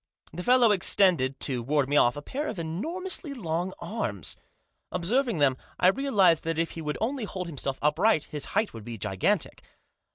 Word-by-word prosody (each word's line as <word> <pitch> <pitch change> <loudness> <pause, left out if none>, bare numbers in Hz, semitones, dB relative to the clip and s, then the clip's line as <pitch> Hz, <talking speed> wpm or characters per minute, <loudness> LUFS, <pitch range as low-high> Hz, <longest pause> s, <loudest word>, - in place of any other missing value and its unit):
The 175 - -5
fellow 245 +1 +5
extended, 175 -8 +3
to 130 -4 0
ward 140 +2 +1
me 145 - -1
off, 120 -2 +4
a 145 - -6
pair 290 - -4
of 220 - -4
enormously 295 - -4
long 175 -4 -2
arms. 105 - -4 0.6
Observing 235 +4 0
them, 140 -3 +3 0.2
I 180 - +6
realised 195 - +3
that 165 -1 -1
if 165 0 0
he 165 - -7
would 150 -1 -3
only 245 +1 -1
hold 185 -2 -5
himself 140 -4 -3
upright 155 +3 +3
his 150 -2 -4
height 215 0 +1
would 115 -2 -9
be 115 0 -7
gigantic. 95 -2 -1
170 Hz, 175 wpm, -27 LUFS, 145-225 Hz, 0.6 s, I